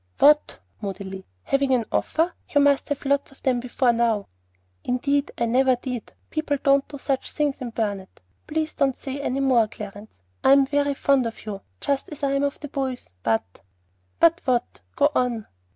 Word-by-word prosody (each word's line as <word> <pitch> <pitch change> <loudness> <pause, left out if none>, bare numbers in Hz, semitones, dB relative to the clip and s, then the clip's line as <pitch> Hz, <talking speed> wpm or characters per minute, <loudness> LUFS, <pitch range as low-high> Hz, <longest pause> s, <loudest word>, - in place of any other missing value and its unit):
"What?" 300 +1 +5 0.2
moodily. 190 -1 -6 0.2
"Having 275 -1 +2
an 235 -3 0
offer? 330 +3 +1 0.2
You 290 - +3
must 285 0 +3
have 290 -1 -2
had 275 - -3
lots 280 -1 +1
of 270 - -20
them 255 -2 +2
before 245 0 +1
now." 230 -3 +1 0.5
"Indeed 280 +3 0
I 235 - +1
never 255 +2 +3
did. 245 -2 -6 0.2
People 310 -2 0
don't 275 -1 +4
do 290 - -8
such 270 -1 -2
things 290 -3 -1
in 250 - -3
Burnet. 205 -4 -3 0.3
Please 310 0 -1
don't 275 -3 +1
say 275 +1 -5
any 275 0 -1
more, 250 -5 +4
Clarence. 205 - -10 0.2
I'm 275 0 +6
very 285 0 +1
fond 270 -3 +3
of 225 - -8
you, 200 -2 -5 0.2
just 280 -1 -1
as 300 -1 -9
I 275 - +2
am 275 0 +1
of 285 0 -1
the 295 - -5
boys; 265 -2 -3
but 110 -4 -1 0.3
" 90 0 -43
"But 335 +1 +5
what? 250 -2 0
Go 290 +1 +4
on." 240 -5 0
265 Hz, 185 wpm, -24 LUFS, 230-285 Hz, 0.5 s, I'm